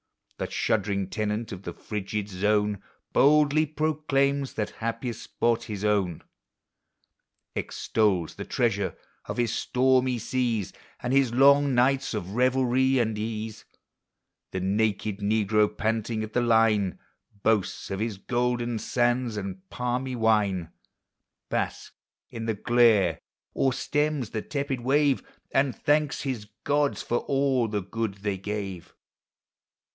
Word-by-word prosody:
The - - -2
shuddering 100 -3 0
tenant 110 +1 -2
of 95 - -6
the 85 -3 -6
frigid 105 +1 -4
zone 105 +1 +1 0.3
Boldly 150 +2 +4
proclaims 140 -2 0
that 105 -1 -2
happiest 115 0 -3
spot 120 0 0
his 105 -2 -4
own; 100 -6 +1 1.3
Extols 95 -7 0
the - - -6
treasures 100 -7 0 0.3
of - - -5
his 120 -2 +1
stormy 130 0 +2
seas, 115 -3 -1 0.3
And 125 +1 -1
his 135 -3 +4
long 140 +2 +5
nights 130 0 +2
of 95 -3 -4
revelry 130 +2 +2
and 110 -3 +1
ease: 110 0 -4 0.8
The 95 - -3
naked 100 +1 0
negro, 105 0 +2
panting 110 0 -1
at 110 0 -7
the 125 - +2
line, 110 -5 +3 0.5
Boasts 105 -4 0
of 95 - -2
his 110 -2 -2
golden 120 +1 -1
sands 120 0 0
and 95 -1 -6
palmy 125 +1 -2
wine, 105 -7 +1 0.8
Basks - - -2 0.4
in 115 0 -5
the 110 - 0
glare, 110 -7 +4 0.3
or 135 - +2
stems 150 -2 -1
the 110 - -2
tepid 140 -1 -3
wave, 140 +2 +2 0.3
And 135 -1 +2
thanks 150 0 +1
his 130 -7 -3 0.2
gods 145 0 +1
for 120 - 0
all 135 -3 +1
the 105 -2 -2
good 110 +1 -3
they 100 -1 -3
gave. 100 -3 -5
115 Hz, 125 wpm, -27 LUFS, 105-130 Hz, 1.3 s, long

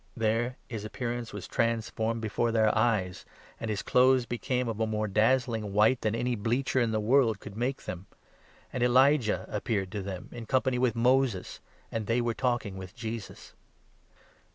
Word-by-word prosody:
There 115 +3 0
his 110 -3 -5
appearance 120 +1 -4
was 105 -3 -7
transformed 115 0 -1
before 115 +2 0
their 110 -1 +3
eyes, 110 -5 +1 0.4
and 115 - -4
his 105 -2 -2
clothes 130 0 +4
became 125 +1 -1
3 115 - -1
of 110 - -7
a 110 - +1
more 110 0 -1
dazzling 110 0 +1
white 110 +5 +4
than 110 0 0
any 120 +1 0
bleacher 120 +5 0
in 120 -2 +2
the 110 -1 0
world 115 -1 +3
could 105 -1 -10
make 125 +4 -2
them. 90 +1 -6 0.7
And 130 - -2
Elijah 130 -1 +4
appeared 100 -3 -2
to 105 -1 -3
them, 95 -2 -6
in 115 -2 -8
company 130 0 +1
4 - - -1
with 125 -4 +2
Moses; 125 -4 +1 0.3
and 110 -2 -3
they 115 +1 +2
were 120 -1 0
talking 120 -5 -1
with 95 +1 -9
Jesus. 115 -3 -7
115 Hz, 175 wpm, -29 LUFS, 105-125 Hz, 0.7 s, clothes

